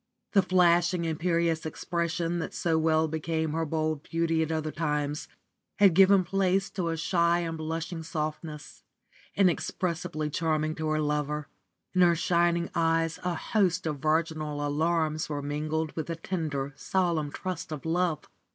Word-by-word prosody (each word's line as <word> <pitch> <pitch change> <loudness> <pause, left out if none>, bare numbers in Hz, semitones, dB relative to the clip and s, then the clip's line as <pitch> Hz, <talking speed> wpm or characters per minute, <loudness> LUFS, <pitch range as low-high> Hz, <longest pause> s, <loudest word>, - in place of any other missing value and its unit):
The 200 - +5
flashing, 175 -1 +3
imperious 165 0 0
expression 170 +1 -2
that - - -5
so 165 -2 +1
well 160 0 +3
became 160 0 -2
her 165 0 -1
bold 155 -1 -1
beauty 165 0 0
at 160 0 -1
other 155 -1 -1
times 150 -2 -2 0.5
had 200 -3 +6
given 195 +1 +6
place 195 +1 +1
to 180 -4 -2
a 165 - -2
shy 170 +1 +2
and 165 -1 -3
blushing 165 +2 -4
softness, 155 -1 -5 0.5
inexpressibly 175 -4 0
charming 155 0 0
to 160 0 -3
her 155 0 +1
lover. 150 0 -1 0.4
In 185 - +3
her 175 -1 +6
shining 170 0 +1
eyes 165 -1 +1
a 180 -1 -1
host 185 -2 +1
of 150 -3 -2
virginal 155 -1 0
alarms 155 +1 0
were 145 -1 -3
mingled 155 +2 -2
with 160 - -3
the 165 - -3
tender, 155 -5 -3
solemn 165 -2 0
trust 185 -1 -5
of 155 -1 -6
love. 170 -1 0
165 Hz, 150 wpm, -28 LUFS, 155-170 Hz, 0.5 s, had